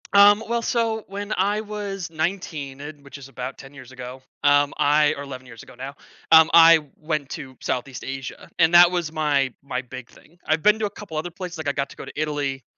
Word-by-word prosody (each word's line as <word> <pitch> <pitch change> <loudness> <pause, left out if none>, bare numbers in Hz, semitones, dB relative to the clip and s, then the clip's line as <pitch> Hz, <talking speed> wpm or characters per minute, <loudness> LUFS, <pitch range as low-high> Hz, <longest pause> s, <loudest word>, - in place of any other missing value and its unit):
Um, 205 +2 +7
well, 235 0 0
so, 225 -2 -1
when 200 +2 -6
I 205 +3 +1
was 205 -4 -5
19, 155 -5 -4
eh, 145 +1 -6
which 140 0 -11
is 135 -1 -12
about 130 0 -6
10 135 +1 -13
years 130 -2 -13
ago, 130 +1 -9 0.2
um, 145 0 +4
I 150 +1 +3
or 140 - -7
11 130 -2 -9
years 115 -2 -12
ago - - -15
now, 135 +2 -7 0.4
um, 160 0 +8
I 165 0 +8 0.2
went 155 -3 -3
to 130 -1 -7
Southeast 125 +1 -4
Asia, 135 0 -7
and 165 0 +4
that 175 0 +8
was 175 -3 -1
my 145 -5 +1
my 130 -2 -3
big 130 -1 -10
thing. 170 - -21
I've 155 0 +1
been 210 +3 +4
to 215 - 0
a - - -2
couple 200 -4 -10
of - - +1
other 175 - -5
places, 180 -1 -7
like, 155 -2 -3
I - - +2
got 140 0 -3
to - - -13
go - - -9
to - - -9
Italy 145 -3 -2
155 Hz, 230 wpm, -23 LUFS, 135-185 Hz, 0.4 s, um